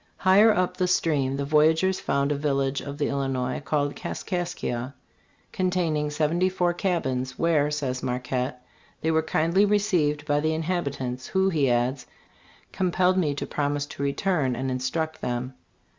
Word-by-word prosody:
Higher 200 +4 +6
up 185 -3 0
the 185 - +1
stream 140 -6 +1
the 140 - -2
voyagers 160 +5 +3
found 140 +1 0
a - - +1
village 140 -1 0
of 140 0 -7
the 145 - 0
Illinois 135 -2 -2
called 145 0 0
Kaskaskia, 140 -8 -4 0.6
containing 175 -5 0
seventy 160 +5 +1
four 180 -2 0
cabins, 130 -9 -1
where, 155 -3 +2
says 135 -4 -2
Marquette, 125 0 -3 0.4
they 160 - +1
were 160 0 +3
kindly 165 +4 +2
received 180 -8 +1
by 145 -1 +2
the 155 +1 0
inhabitants, 140 -7 -3
who, 190 0 +2
he 150 -7 +1
adds, 125 +2 0 0.6
"compelled 185 0 +2
me 150 -5 0
to - - -3
promise 145 0 -1
to 145 - -9
return 140 -2 0
and 130 +2 -2
instruct 155 +5 -2
them." 125 +1 -3
150 Hz, 150 wpm, -25 LUFS, 135-175 Hz, 0.6 s, Higher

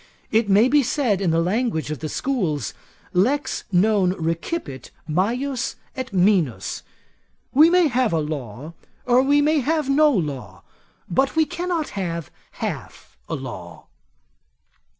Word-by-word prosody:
It 220 -1 +2
may 205 +5 +5
be 290 +3 +4
said, 235 -6 0
in 185 - +1
the 165 0 +2
language 190 -5 -1
of 155 - -4
the 155 - -4
schools, 185 - -1 0.4
Lex 260 +11 +1
non 190 0 +3
recipit 165 - -4 0.2
majus 240 - -1 0.2
et 260 0 -5
minus, 185 - +1 0.7
we 310 +5 +7
may 355 -1 +4
have 255 -3 +1
a 165 - +1
law, 150 -1 -5 0.3
or 250 0 +4
we 285 +2 +3
may 305 +1 +3
have 300 0 0
no 300 +2 +5
law, 150 - -3 0.4
but 265 - +1
we 320 0 +4
cannot 345 -1 -2
have 170 -6 -4 0.2
half - - -6
a - - -1
law. 90 -11 -9
210 Hz, 135 wpm, -22 LUFS, 165-275 Hz, 0.7 s, we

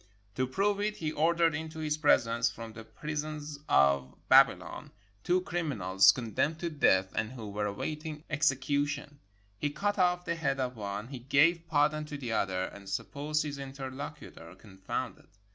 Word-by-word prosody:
To 130 +4 0
prove 200 +8 +1
it, 210 +1 -1
he 155 -2 -2
ordered 165 +1 +3
into 160 +1 -5
his 155 -1 -1
presence, 120 -6 +3
from 115 -1 -9
the 110 0 -9
prisons 150 +2 -5
of 70 -1 +3
Babylon, - - +4 0.3
two 180 +1 +2
crimi 170 -5 -2
nals 95 0 +6
condemned 130 +6 -1
to 170 - -2
death 95 -10 +3
and 110 +2 -2
who 115 -4 -7
were 105 +1 -1
awaiting 150 +8 -5
execu 145 -1 +1
tion. 145 0 -6 0.4
He 145 - 0
cut 205 +7 -1
off 180 0 +2
the 170 - 0
head 150 -5 -1
of 125 -1 -2
one, 105 +1 -5
he 135 -2 -6
gave 160 +7 +3
pardon 155 0 +2
to 150 -1 -6
the 125 -5 -5
other, 95 -4 0
and 100 +1 -8
supposed 145 +9 -2
his 145 -2 -5
interlocutor 135 -10 -8
confounded. 95 -1 -6
145 Hz, 165 wpm, -30 LUFS, 110-155 Hz, 0.4 s, nals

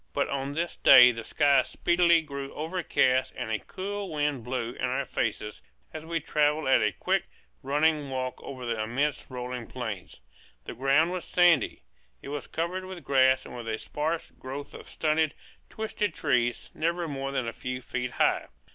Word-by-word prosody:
But - - 0
on 140 0 -2
this 170 +3 -2
day 125 0 +9
the 115 -1 -6
sky 140 +1 +4
speedily 170 +2 +3
grew 140 -2 -6
overcast 150 -6 +1
and 110 - -4
a 110 - 0
cool 200 +1 -5
wind 145 -4 -1
blew 125 -1 -3
in - - -3
our - - -1
faces 105 0 -3 0.3
as 155 0 -7
we 165 0 -1
travelled 150 0 +1
at 130 - +5
a 105 -1 +2
quick, - - 0 0.4
running 150 +1 +1
walk 130 -1 -3
over 130 -2 -7
the 115 -2 -1
immense 135 +7 -1
rolling 125 -2 -5
plain. 110 -7 -5 0.5
The - - -7
ground 140 +6 +3
was 185 -1 -3
sandy; 175 -8 +3 0.4
it - - -9
was 145 0 -5
covered 180 +3 -3
with 185 -3 -8
grass 130 -1 +4
and - - -9
with 120 -2 -7
a 110 -1 -1
sparse 155 +7 -3
growth 135 +2 -8
of - - -11
stunted, 155 -1 +1 0.3
twisted 215 -1 -3
trees, 125 -5 0
never 170 +1 -1
more 135 -2 -4
than 130 -3 -1
a 115 - -3
few 125 +2 -4
feet 125 0 -4
high. - - +2
140 Hz, 175 wpm, -28 LUFS, 125-160 Hz, 0.5 s, day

